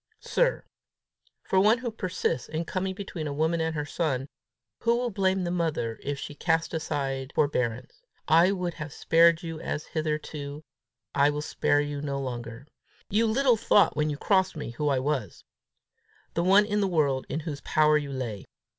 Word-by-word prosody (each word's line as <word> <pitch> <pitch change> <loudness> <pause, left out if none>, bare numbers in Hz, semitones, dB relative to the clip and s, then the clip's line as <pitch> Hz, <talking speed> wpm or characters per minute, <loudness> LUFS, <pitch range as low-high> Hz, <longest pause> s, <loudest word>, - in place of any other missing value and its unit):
"Sir, - - 0 0.8
For 190 - +2
one 215 +4 +5
who 240 -1 -4
persists 185 - -2
in 160 +2 -3
coming 190 +2 -2
between 180 -6 -5
a 145 - -3
woman 160 +3 +1
and 160 0 -1
her 150 -1 -2
son, 140 -4 -2 0.5
who 235 0 +2
will 245 -1 -1
blame 190 -1 +1
the 175 - -2
mother 155 -10 -1
if 145 0 -3
she 145 - -6
cast 165 +2 0
aside 135 -4 -2
forbearance! 125 - -1 0.3
I 170 +4 +5
would 180 -3 -2
have 155 -2 -7
spared 165 +1 +4
you 165 -1 -5
as 150 - -4
hitherto; 150 -1 -4 0.5
I 140 +1 +4
will 150 0 -2
spare 145 -1 +1
you 145 -1 -4
no 140 -1 -2
longer. 120 -1 -6 0.5
You 225 +3 +3
little 245 +1 +3
thought 210 -2 +4
when 150 0 +1
you 145 - -3
crossed 190 +2 +2
me 145 - -5
who 145 +5 -1
I 135 - +2
was 130 - -2 0.9
the 170 - 0
one 195 +3 +6
in 210 0 0
the 200 - +2
world 145 -7 +1
in 150 +4 -2
whose 150 -3 -5
power 155 0 +3
you 145 -2 -1
lay! 120 -7 -4
155 Hz, 180 wpm, -27 LUFS, 140-185 Hz, 0.9 s, one